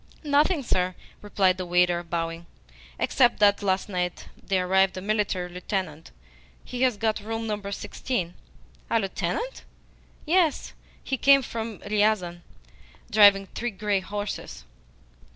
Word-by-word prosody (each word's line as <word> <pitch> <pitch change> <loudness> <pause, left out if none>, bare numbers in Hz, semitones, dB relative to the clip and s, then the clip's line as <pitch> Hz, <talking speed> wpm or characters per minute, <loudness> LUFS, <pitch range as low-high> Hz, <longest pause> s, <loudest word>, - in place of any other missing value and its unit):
"Nothing, 295 +2 +2
sir," 185 -5 0 0.3
replied 190 -3 +1
the 185 - -3
waiter, 175 0 +3
bowing, 165 0 -4 0.5
"except 245 -3 +3
that 205 -1 +4
last 190 -1 0
night 180 -3 -3
there 185 -2 0
arrived 190 0 +3
a - - -2
military 200 -3 -1
lieutenant. 180 -3 -4 0.6
He 250 0 -5
has 255 -5 +2
got 220 +1 0
room 225 +2 -4
number 205 -2 -4
sixteen." 195 -3 -3 0.6
"A 230 - +3
lieutenant?" 460 - -3 0.6
"Yes. 330 -2 +1 0.3
He 265 - -2
came 275 +1 +5
from 225 -3 -5
Riazan, 205 -5 +1 0.7
driving 200 -2 +6
three 240 - -2
grey 205 -1 -1
horses." 205 +2 -6
205 Hz, 125 wpm, -26 LUFS, 185-225 Hz, 0.7 s, driving